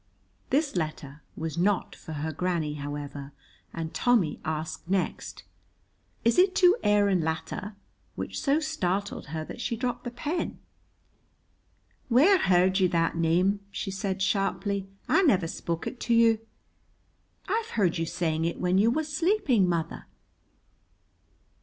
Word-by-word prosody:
This 285 -1 +1
letter 155 -3 -4 0.2
was 160 0 -3
not 195 +1 +1
for 160 - -9
her 155 +1 -3
granny, 165 -2 -1
however, 145 -1 -6 0.4
and 165 -1 -5
Tommy 225 -11 +2
asked 155 +2 -4
next, 190 -1 -2 0.8
"Is 230 +9 +4
it 370 +1 +4
to 365 0 +6
Aaron 205 -3 +3
Latta?" 175 +6 -4 0.4
which - - -4
so 285 +2 +2
startled 200 - -2
her 155 +2 -4
that 235 - -8
she 240 - -1
dropped 245 0 -2
the 240 - -3
pen. 295 +8 -3 1.5
"Whaur 320 +11 +6
heard 185 +1 +3
you 185 - +4
that 165 -1 +1
name?" 175 +5 +2
she 195 - -4
said 190 0 -2
sharply. 195 0 0 0.2
"I - - +4
never 200 - +3
spoke 165 0 -4
it 250 - -5
to 235 - +1
you." 230 -1 +5 1.1
"I've 445 +3 -1
heard 180 -5 +2
you 165 - -1
saying 160 -2 -1
it 170 - -2
when 180 +1 +2
you 215 +3 +5
was 305 +4 -1
sleeping, 300 - +2
mother." 165 -1 -2
190 Hz, 140 wpm, -27 LUFS, 165-240 Hz, 1.5 s, to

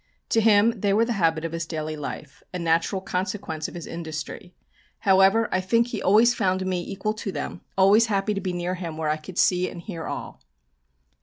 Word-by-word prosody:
To 225 - +3
him 215 0 +5
they 200 0 +1
were 225 +3 +3
the 235 - -1
habit 160 -1 +2
of 165 - -3
his 165 0 -4
daily 155 -1 -4
life, 150 0 -7
a 180 - -4
natural 170 +3 +1
consequence 185 -4 -3
of - - -11
his 170 - -6
industry. 160 +2 -7 0.5
However, 195 +3 +4
I 185 - +1
think 230 +5 +2
he 225 - -4
always 220 +5 +5
found 190 -4 0
me 185 -1 -1
equal 195 +4 -3
to 215 -2 -5
them, 175 - -5 0.2
always 205 +4 +5
happy 205 0 0
to 200 - -3
be 185 -1 -2
near 175 +1 -2
him 170 -4 -5
where 160 -1 -1
I 155 - +1
could 170 +4 -11
see 180 0 +3
and 175 - -9
hear 170 -3 -6
all. - - -6
185 Hz, 210 wpm, -25 LUFS, 165-205 Hz, 0.5 s, him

